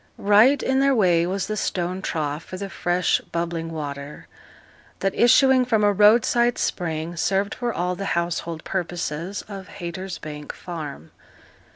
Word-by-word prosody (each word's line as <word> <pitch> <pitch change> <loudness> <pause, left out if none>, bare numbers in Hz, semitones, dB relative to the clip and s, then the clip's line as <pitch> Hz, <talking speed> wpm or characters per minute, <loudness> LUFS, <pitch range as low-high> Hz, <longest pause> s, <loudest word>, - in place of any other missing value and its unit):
Right 215 +7 +5
in 265 0 +1
their 275 0 +3
way 175 -6 +3
was 190 +1 -2
the 215 - -3
stone 185 -2 -2
trough 155 -3 -3
for 185 - -7
the 200 0 -6
fresh 175 0 +1
bubbling 170 -1 -2
water, 145 -2 -6 0.7
that, 195 0 +1
issuing 260 +2 +5
from 225 -4 +1
a 205 0 +4
roadside 235 +4 +4
spring, 165 -1 -2
served 195 +4 0
for 240 -1 -2
all 180 -2 -2
the 195 - -5
household 170 -1 -2
purposes 175 0 -3
of 195 -3 -8
Haytersbank 170 -4 -6
Farm. 150 - -8
180 Hz, 145 wpm, -23 LUFS, 165-210 Hz, 0.7 s, Right